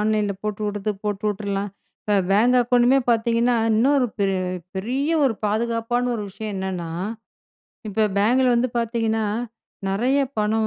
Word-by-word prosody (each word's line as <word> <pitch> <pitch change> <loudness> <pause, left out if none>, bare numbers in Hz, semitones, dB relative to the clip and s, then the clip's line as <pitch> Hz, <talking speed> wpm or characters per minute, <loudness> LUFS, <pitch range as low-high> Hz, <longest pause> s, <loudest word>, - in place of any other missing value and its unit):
ஆன்லைன்ல 210 -1 +1
போட்டுவுடுது, 210 0 -2
போட்டுவுட்டுரலாம். 205 -1 -2 0.3
இப்போ 210 - 0 0.2
பேங்க் 230 +6 +4
அக்கவுண்டுமே 245 +2 +4
பார்த்தீங்கன்னா, 235 +1 +2 0.2
இன்னும் 245 +7 +3
ஒரு 255 - +2
பெ 200 - +2 0.5
பெரிய 260 +10 -1
ஒரு 250 - +2
பாதுகாப்பான 235 +3 0
ஒரு 220 - -3
விஷயம் 215 +2 -6
என்னன்னா? 185 -3 -4 1.0
இப்ப 215 +1 +1
பேங்க்ல 250 +5 +3
வந்து 240 +2 +2
பார்த்தீங்கன்னா, 225 -1 0 0.6
நெறைய 245 +8 +1 0.2
பணம் 220 +1 +1
220 Hz, 125 wpm, -23 LUFS, 205-240 Hz, 1.0 s, பேங்க்